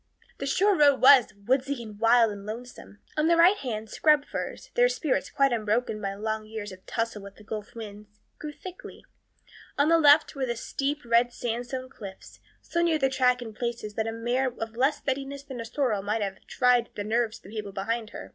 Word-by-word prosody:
The 275 - -3
shore 400 +7 +3
road 285 -4 +5
was 265 -3 +7
"woodsy 260 +1 0
and 210 -2 -11
wild 230 0 +5
and 200 -1 -8
lonesome." 225 0 -9 0.2
On 305 +1 +2
the 335 0 +4
right 355 +5 +6
hand, 220 - -4
scrub 300 +4 +3
firs, - - -6
their - - +4
spirits 325 - -1
quite 275 -2 +2
unbroken 215 0 -1
by 195 -1 -3
long 215 +1 -3
years 215 -2 -6
of 185 0 -13
tussle 230 -2 -2
with 200 0 -11
the 210 - -16
gulf 215 0 -7
winds, 210 -2 -9 0.3
grew 300 - -6
thickly. 365 +4 -11 0.7
On 285 +2 +3
the 330 0 +5
left 300 0 +6
were 270 -3 -2
the 235 - -1
steep 280 +5 -3
red 235 +1 +3
sandstone 245 +2 -4
cliffs, 200 -7 -11 0.2
so 340 - -1
near 335 -2 +3
the 270 -3 +2
track 250 -1 +2
in 225 -2 -9
places 235 -2 -4
that 220 +1 -2
a - - -1
mare 240 +3 0
of 225 0 -5
less 270 +5 +2
steadiness 275 +1 -4
than 270 -3 -8
the 230 - -5
sorrel 235 -5 -1
might 210 +2 -1
have 195 -1 -5
tried 245 -2 +2
the 205 - -3
nerves 225 +1 0
of - - -25
the - - -12
people 210 -2 -5
behind 220 +3 -3
her. - - -9
240 Hz, 210 wpm, -27 LUFS, 215-275 Hz, 0.7 s, was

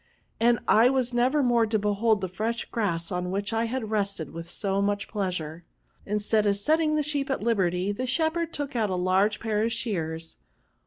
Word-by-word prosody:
and 235 +1 +4
I 230 +3 +6
was 255 -2 0
never 255 +5 +2
more 240 -2 +3
to 220 0 +1
behold 210 +1 +1
the 190 - -1
firesh 220 +6 -3
grass 170 -7 -1
on 180 0 -2
which 200 +3 -2
I 225 +1 +1
had 230 -2 -3
rested 200 -6 -2
with 165 +1 -8
so 195 +2 -1
much 205 0 -1
pleasure. 175 -5 -3 0.4
Instead 210 +1 +1
of 200 -1 +2
setting 310 +8 +2
the 305 - +1
sheep 285 -2 -2
at 265 - -1
liberty, 190 -4 +1
the 255 +5 -3
shepherd 320 +4 0
took 290 -3 -4
out 220 -3 +1
a 185 - -1
large 190 +4 +2
pair 215 -2 -1
of 230 - 0
shears. 165 -8 -3
215 Hz, 195 wpm, -26 LUFS, 190-240 Hz, 0.4 s, I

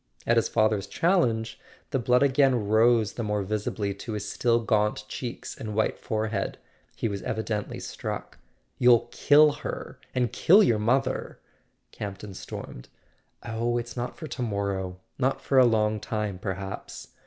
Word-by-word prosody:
At - - +3
his - - +2
father's 110 -2 +2
challenge 120 -11 +1 0.3
the 135 - +1
blood 125 +2 +3
again 135 -5 +3
rose 110 0 +4
the - - -4
more 105 -1 -1
visibly 105 0 -2
to 105 +3 -7
his 105 -1 -4
still 115 +3 +2
gaunt 105 -2 +1
cheeks 120 +2 -6
and 105 -2 -6
white 110 - 0
forehead: 110 -2 -2 0.4
he - - -1
was 100 -2 -4
evidently 110 -1 -3
struck. - - -6 0.4
"You'll 120 -2 +5
kill 150 0 +6
her—and 130 -4 -4
kill 200 +6 +6
your 115 - +3
mother!" 130 +4 0 0.5
Campton 100 -1 -7
stormed. 60 - -8 0.5
"Oh, 115 +1 -1
it's 120 -1 -5
not 120 0 -4
for 160 - -7
to 140 - -6
morrow. 100 -4 -2 0.2
Not 135 +1 +1
for 135 0 +3
a 125 - +7
long 110 -1 +2
time, 105 -3 -3
perhaps. 95 0 -6
110 Hz, 150 wpm, -27 LUFS, 105-125 Hz, 0.5 s, a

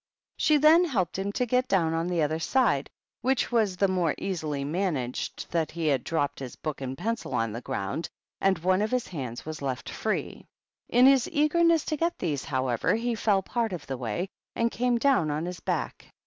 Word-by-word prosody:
She 305 -1 +4
then 310 +4 +6
helped 190 - -1
him 200 +1 -1
to 250 - 0
get 250 +2 +1
down 165 -4 +2
on 165 +1 0
the 175 -3 +1
other 155 +2 0
side, 200 - +2 0.3
which 255 +1 +1
was 215 -6 +2
the 195 - +3
more 180 -4 +1
easily 155 -7 -3
managed 150 -5 -2
that 165 -2 0
he 165 -1 -4
had 140 -5 +2
dropped 150 -4 -1
his 130 -2 -7
book 155 -3 -5
and 130 0 -4
pencil 230 +5 -3
on 115 -2 0
the 115 +3 -5
ground, 100 +9 -3 0.3
and 190 -1 +3
one 185 +4 +2
of 215 - +1
his 250 0 0
hands 130 -8 -6
was 155 -1 -6
left 130 -2 -3
free. - - -3 0.4
In 245 +2 +5
his 270 -2 +5
eagerness 330 +1 +3
to 310 - -1
get 335 +3 0
these, 145 -6 -2
however, 130 - 0
he 235 +1 -1
fell 205 -3 +2
part 230 0 -1
of 160 -5 -6
the 135 - -4
way 125 - -3 0.3
and 230 0 +1
came 245 0 +1
down 255 - +3
on 150 +3 -2
his 180 -1 -5
back. - - -3
180 Hz, 205 wpm, -27 LUFS, 145-240 Hz, 0.4 s, then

